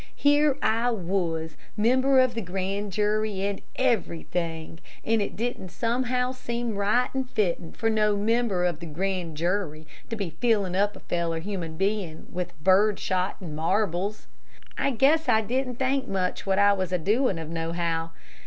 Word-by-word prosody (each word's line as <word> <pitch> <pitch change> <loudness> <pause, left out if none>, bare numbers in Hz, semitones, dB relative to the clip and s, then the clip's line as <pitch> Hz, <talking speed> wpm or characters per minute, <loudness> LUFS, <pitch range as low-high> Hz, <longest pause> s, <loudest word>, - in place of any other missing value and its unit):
Here 290 -1 +4
I 230 +2 +2
was, 175 -6 -1 0.2
member 260 +5 +4
of 255 -1 +4
the 230 - -3
grand 195 +2 -3
jury, 210 0 0
and 200 -1 -2
everything, 170 -9 -1 0.3
and 225 -1 +2
it 200 - -3
didn't 230 -4 -3
somehow 250 +5 0
seem 235 -3 -3
right 210 +6 +1
and 265 -1 -2
fittin' 175 -7 -1
for 225 - -1
no 215 -2 +2
member 215 -3 +1
of 175 -4 0
the 170 - -7
grand 175 0 -3
jury 170 -2 -1 0.2
to 230 - -2
be 200 -6 -3
fillin' 200 0 +1
up 205 +2 +2
a - - -12
feller 170 -1 -1
human 170 -3 -5
bein' 195 -5 -1
with 180 -1 -4
bird 195 +2 +5
shot 185 0 -1
an' 165 -5 -6
marbles. 190 +4 0 0.5
I - - +1
guess 285 +5 +3
I 220 - +5
didn't 250 +3 -1
think 265 +1 0
much 185 0 -2
what 190 0 +2
I 200 0 +6
was 185 -2 -2
a 180 - +2
doin' 210 - +1
of, 160 -1 -6
no 165 0 -2
how. 165 -1 -1
200 Hz, 170 wpm, -26 LUFS, 175-230 Hz, 0.5 s, I